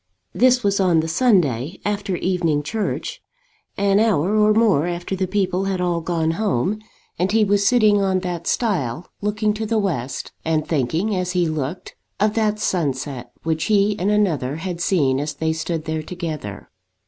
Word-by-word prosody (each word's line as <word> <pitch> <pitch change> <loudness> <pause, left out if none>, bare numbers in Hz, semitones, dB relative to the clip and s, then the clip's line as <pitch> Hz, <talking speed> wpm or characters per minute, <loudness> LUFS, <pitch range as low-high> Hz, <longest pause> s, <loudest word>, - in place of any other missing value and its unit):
This 250 0 +4
was 200 0 +1
on 175 -4 +3
the 160 - -4
Sunday, 165 - +1
after 200 -2 -1
evening 170 -5 0
church, 215 +7 -3 0.6
an 200 0 +3
hour 210 -3 +2
or 215 0 +4
more 210 -8 +3
after 175 +2 -3
the 190 0 -1
people 190 -1 0
had 195 -1 -1
all 175 -2 0
gone 165 -1 0
home, 200 - 0 0.4
and 185 +2 +1
he 220 0 +4
was 200 0 +2
sitting 215 -4 +4
on 190 -1 +1
that 175 -2 -4
stile, 175 - -1
looking 210 +1 0
to 220 +1 -3
the 225 +1 +1
west, 155 - -2
and 160 -1 0
thinking, 165 - 0
as 180 -1 -2
he 175 -2 +2
looked, 155 +4 -4 0.2
of 210 +1 +2
that 215 -1 +1
sunset 135 -9 -2
which 160 -1 -1
he 205 -1 +3
and 190 - +1
another 165 -11 +1
had 170 +1 -5
seen 140 -8 +2
as 150 +1 -3
they 160 +2 0
stood 160 0 -3
there 160 0 -2
together. 155 - -6
180 Hz, 170 wpm, -21 LUFS, 160-205 Hz, 0.6 s, This